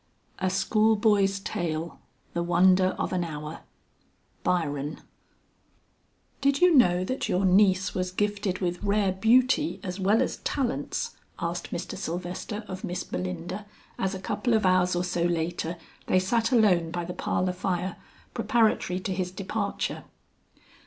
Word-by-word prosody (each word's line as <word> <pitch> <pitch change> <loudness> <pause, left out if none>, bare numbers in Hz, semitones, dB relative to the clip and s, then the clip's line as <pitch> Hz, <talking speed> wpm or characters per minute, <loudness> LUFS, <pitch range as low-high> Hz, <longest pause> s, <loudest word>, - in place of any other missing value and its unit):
"A 190 -1 +1
school 215 +4 +3
boy's 200 -2 +3
tale; 165 -3 -3 0.3
the 170 - -1
wonder 185 +2 +4
of - - -2
an 180 -1 +1
hour." 150 -1 -6 0.8
BYRON. 145 -4 -1 1.4
"Did 275 0 +2
you 360 -1 +6
know 180 -8 +5
that 260 +8 -3
your 185 +2 +2
niece 190 0 +4
was 185 0 -1
gifted 205 0 -1
with 175 -1 -1
rare 200 -1 +2
beauty 255 - +3
as 180 0 -5
well 205 +6 +3
as - - -3
talents?" 240 - -2 0.2
asked - - -3
Mr. - - -5
Sylvester 180 +5 -4
of 185 0 -7
Miss 180 +1 -3
Belinda 175 - -5 0.3
as 190 +1 -1
a - - -5
couple 235 +4 0
of 215 -2 +2
hours 185 -1 +3
or 175 - 0
so 180 -1 -2
later, 170 0 -1 0.3
they - - +3
sat 230 +6 +1
alone 190 -9 +4
by 175 0 -3
the 180 - -5
parlor 185 +1 -1
fire, 180 0 -2 0.4
preparatory 220 -6 +1
to 190 - -2
his 185 -1 -2
departure. 200 +2 -3
185 Hz, 145 wpm, -27 LUFS, 175-205 Hz, 1.4 s, you